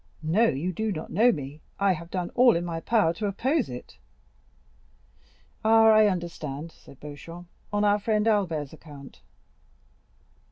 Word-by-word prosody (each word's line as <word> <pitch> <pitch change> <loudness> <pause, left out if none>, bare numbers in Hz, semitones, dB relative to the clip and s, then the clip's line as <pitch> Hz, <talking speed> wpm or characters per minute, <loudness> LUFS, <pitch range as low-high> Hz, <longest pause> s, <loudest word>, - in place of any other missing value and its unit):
No, 195 +9 +3
you 170 +5 -2
do 220 +4 -2
not 160 -4 -6
know 230 +7 +4
me; 145 - -7 0.2
I 200 -1 +3
have 170 -1 -5
done 180 -2 -3
all 245 -3 +5
in 170 +1 -1
my 165 -1 -4
power 205 -2 +2
to 210 +4 -3
oppose 255 +9 0
it." 125 0 -10 1.6
"Ah, 225 0 +6
I 215 -1 +6
understand," 165 -5 -4
said 135 - -18
Beauchamp, 165 +4 -10 0.3
"on 205 0 0
our 205 0 +3
friend 215 +1 0
Albert's 165 -10 0
account." 145 -3 -13
175 Hz, 150 wpm, -26 LUFS, 155-215 Hz, 1.6 s, Ah